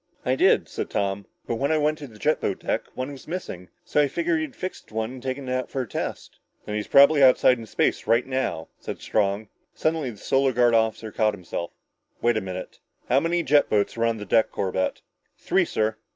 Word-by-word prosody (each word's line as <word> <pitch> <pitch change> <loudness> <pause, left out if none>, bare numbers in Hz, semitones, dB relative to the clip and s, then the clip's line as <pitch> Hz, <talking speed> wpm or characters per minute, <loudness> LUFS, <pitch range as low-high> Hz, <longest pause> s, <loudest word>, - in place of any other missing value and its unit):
"I - - +2
did," - - +4
said - - -5
Tom, 100 0 -2 0.2
"but 115 - -2
when 140 +4 0
I 160 - +3
went 155 +1 +1
to 145 - -7
the 110 -4 -15
jet 155 +8 +1
boat 95 - -1
deck, - - -1
one 130 +2 -4
was 140 - -11
missing. 125 - -6 0.2
So 150 - +2
I 145 - +3
figured 165 +3 0
he 160 - -1
had 145 - -13
fixed 185 -9 -7
one 110 +1 -2
and 130 -1 -9
taken 130 +1 -4
it 125 - -1
out 130 -1 -2
for 135 - -2
a - - -10
test." - - -5 0.3
"Then 105 - -5
he's 105 0 -2
probably 140 +1 +6
outside 130 -1 +6
in 115 - -9
space - - 0
now!" 125 -7 0
said - - -6
Strong. 105 0 0 0.3
Suddenly 155 -4 0
the 110 - -9
Solar 135 +4 +1
Guard 120 0 +4
captain 110 -1 +1
caught 110 -1 +1
himself. 85 -2 -5 0.5
"Wait 120 0 +2
a 110 - 0
minute! 95 -1 -7 0.3
How 130 - +5
many 170 +2 0
jet 145 -2 +4
boats 105 -1 +1
were 115 - +1
on 115 -1 +1
the 105 - -7
deck, 110 +3 +3
Corbett?" 95 -1 -2 0.4
"Three, - - +1
sir." 110 0 -1
120 Hz, 225 wpm, -25 LUFS, 105-140 Hz, 0.5 s, probably